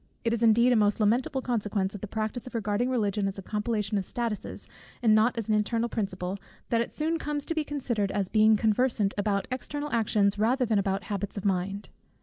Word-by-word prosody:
It 230 -1 +1
is 235 - -1
indeed 235 +2 +5
a - - +3
most 210 -1 +2
lamentable 245 +5 +1
consequence 210 -5 -1
of 205 - -8
the 210 - -4
practice 220 +4 -3
of 250 - -9
regarding 215 +2 0
Religion 210 -5 0
as 195 - -4
a 195 - -7
compilation 210 0 -1
of - - -3
statutes, 230 +1 -3 0.4
and 220 -2 +5
not 220 +3 +3
as 225 - -2
an 215 - +2
internal 225 +3 +1
principle, 190 -3 -3 0.3
that 230 -1 +2
it 235 - -3
soon 320 +2 -1
comes 295 -2 -3
to 330 - -2
be 315 -1 0
considered 245 -9 -2
as 200 -2 -1
being 215 +1 +4
conversant 220 -1 +1
about 200 -1 0
external 290 +3 -4
actions 210 -3 +2
rather 250 +4 +2
than 220 -3 +2
about 195 0 -1
habits 205 0 -4
of 200 - -5
mind. 195 +1 -1
215 Hz, 210 wpm, -28 LUFS, 200-240 Hz, 0.4 s, indeed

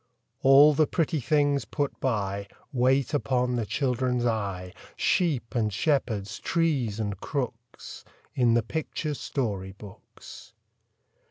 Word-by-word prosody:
All 140 +3 +7
the 150 +1 +3
pretty 160 -1 0
things 145 +1 +2
put 145 -2 -3
by, 100 -5 -1 0.3
Wait 130 +2 +2
upon 125 -3 0
the 115 -3 -2
children's 125 -2 0
eye, 100 -6 -2 0.2
Sheep 150 -11 0
and 110 -3 0
shepherds, 110 -3 -1
trees 140 -11 0
and 100 -3 -3
crooks, 120 -3 -6 0.3
In 120 -3 +3
the 120 - +2
picture 155 +4 -3
story 100 -10 -3
books. 100 0 -13
125 Hz, 115 wpm, -27 LUFS, 110-145 Hz, 0.3 s, All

